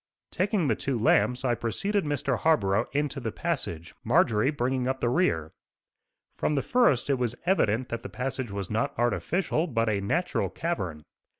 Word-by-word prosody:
Taking 190 Hz, -3 st, +1 dB
the 115 Hz, -, +2 dB
two 135 Hz, +2 st, -2 dB
lamps 125 Hz, +3 st, +2 dB
I 120 Hz, -, +3 dB
preceded 195 Hz, -, -1 dB
Mr. 140 Hz, -4 st, -1 dB
Harborough 115 Hz, -9 st, +2 dB
into 145 Hz, 0 st, -1 dB
the 115 Hz, -4 st, -3 dB
passage, 95 Hz, -, -3 dB
Marjorie 110 Hz, +4 st, +3 dB
bringing 130 Hz, -2 st, -1 dB
up 130 Hz, 0 st, -1 dB
the 120 Hz, -, +1 dB
rear. 80 Hz, -, +1 dB, 0.9 s
From 150 Hz, -, 0 dB
the 140 Hz, -, 0 dB
first 240 Hz, -, +3 dB
it 140 Hz, -3 st, +1 dB
was 120 Hz, -1 st, -1 dB
evident 130 Hz, -, +2 dB
that 115 Hz, -1 st, -3 dB
the -, -, -7 dB
passage 130 Hz, -1 st, -3 dB
was 100 Hz, -1 st, -5 dB
not 110 Hz, +1 st, -1 dB
artificial, 155 Hz, +8 st, 0 dB
but 115 Hz, -6 st, 0 dB
a 100 Hz, -2 st, 0 dB
natural 175 Hz, -, 0 dB
cavern. 90 Hz, -, -3 dB
125 Hz, 170 wpm, -27 LUFS, 110-155 Hz, 0.9 s, I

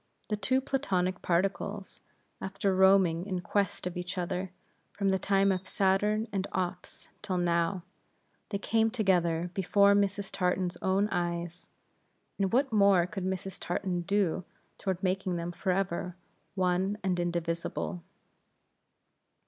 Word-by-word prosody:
The 215 Hz, -, +1 dB
two 255 Hz, +6 st, +2 dB
Platonic 190 Hz, -10 st, -1 dB
particles, 195 Hz, +3 st, -1 dB, 0.4 s
after 195 Hz, 0 st, -1 dB
roaming 190 Hz, -2 st, +4 dB
in 185 Hz, -2 st, -2 dB
quest 200 Hz, 0 st, -1 dB
of 180 Hz, 0 st, -3 dB
each 180 Hz, +1 st, -4 dB
other, 180 Hz, +1 st, -2 dB, 0.4 s
from 200 Hz, -1 st, 0 dB
the 190 Hz, 0 st, +2 dB
time 195 Hz, 0 st, +3 dB
of 185 Hz, 0 st, -2 dB
Saturn 205 Hz, +4 st, +1 dB
and 195 Hz, -1 st, -1 dB
Ops 180 Hz, -1 st, -4 dB
till 185 Hz, -2 st, -2 dB
now; 170 Hz, +1 st, +1 dB, 0.7 s
they 200 Hz, -, -1 dB
came 225 Hz, +2 st, +2 dB
together 180 Hz, -6 st, +1 dB
before 200 Hz, +2 st, +4 dB
Mrs. 200 Hz, 0 st, 0 dB
Tartan's 180 Hz, -1 st, 0 dB
own 195 Hz, +2 st, +2 dB
eyes; 175 Hz, 0 st, -3 dB, 0.7 s
and 195 Hz, -1 st, +1 dB
what 265 Hz, 0 st, +2 dB
more 200 Hz, -4 st, +5 dB
could 195 Hz, 0 st, -5 dB
Mrs. 190 Hz, 0 st, -4 dB
Tartan 175 Hz, 0 st, -2 dB
do 185 Hz, -1 st, 0 dB, 0.4 s
toward 190 Hz, -2 st, -2 dB
making 185 Hz, -1 st, 0 dB
them 170 Hz, 0 st, -3 dB
forever 180 Hz, -1 st, -1 dB, 0.4 s
one 185 Hz, +2 st, +1 dB
and 185 Hz, -2 st, 0 dB
indivisible? 165 Hz, -, -2 dB
190 Hz, 130 wpm, -30 LUFS, 175-200 Hz, 0.7 s, more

